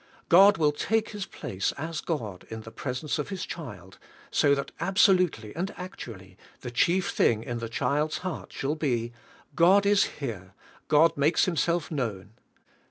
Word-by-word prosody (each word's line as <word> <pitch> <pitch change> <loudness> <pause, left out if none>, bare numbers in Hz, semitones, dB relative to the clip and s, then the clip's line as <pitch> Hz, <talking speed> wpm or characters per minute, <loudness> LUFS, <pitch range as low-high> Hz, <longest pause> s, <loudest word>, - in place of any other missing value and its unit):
God 195 +3 +7
will 150 -2 +3
take 220 +9 0
His 205 -2 -5
place 95 0 -3
as 160 +2 -5
God 110 - -4
in 110 0 -6
the 110 - -11
presence 130 +5 -3
of 150 - -3
His 190 -2 -4
child, 95 - -9 0.3
so 140 -1 +4
that 140 - -4
absolutely 185 - +2
and 185 +5 -2
actually 105 - -9 0.2
the 120 - -6
chief 180 +10 +2
thing 110 -1 +2
in 120 0 -4
the 115 -1 -5
child's 145 +6 0
heart 185 - -5
shall 140 +2 -2
be: 120 -7 -1 0.4
''God 190 +4 +5
is 200 0 +4
here, 105 -9 -7 0.3
God 155 +2 +4
makes 150 +4 +3
Himself 170 -1 0
known." 110 -9 -3
150 Hz, 160 wpm, -27 LUFS, 115-180 Hz, 0.4 s, God